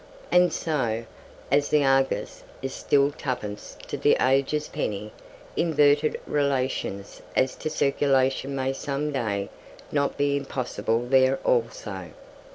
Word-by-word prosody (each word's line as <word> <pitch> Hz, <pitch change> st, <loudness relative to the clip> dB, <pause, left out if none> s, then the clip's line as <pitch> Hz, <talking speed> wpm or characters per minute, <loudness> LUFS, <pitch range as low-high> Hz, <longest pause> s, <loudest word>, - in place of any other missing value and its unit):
And 180 Hz, 0 st, +5 dB
so, 120 Hz, -8 st, -1 dB, 0.5 s
as 145 Hz, +1 st, +3 dB
"The 150 Hz, -1 st, +3 dB
Argus" 135 Hz, 0 st, +1 dB, 0.2 s
is 135 Hz, 0 st, -3 dB
still 140 Hz, 0 st, +2 dB
twopence 125 Hz, -8 st, -5 dB
to -, -, -4 dB
"The -, -, +4 dB
Age's" 140 Hz, +3 st, +2 dB
penny, 105 Hz, +1 st, -3 dB, 0.4 s
inverted 150 Hz, -2 st, +3 dB
relations 130 Hz, -8 st, -1 dB
as 130 Hz, 0 st, +2 dB
to -, -, -3 dB
circulation 135 Hz, -2 st, +1 dB
may 135 Hz, 0 st, -1 dB
some 145 Hz, +2 st, -3 dB
day 100 Hz, -7 st, -2 dB, 0.4 s
not 140 Hz, -1 st, 0 dB
be 145 Hz, 0 st, +2 dB
impossible 125 Hz, -4 st, -2 dB
there 130 Hz, +1 st, +4 dB
also. 105 Hz, -6 st, -1 dB
135 Hz, 120 wpm, -26 LUFS, 120-145 Hz, 0.5 s, And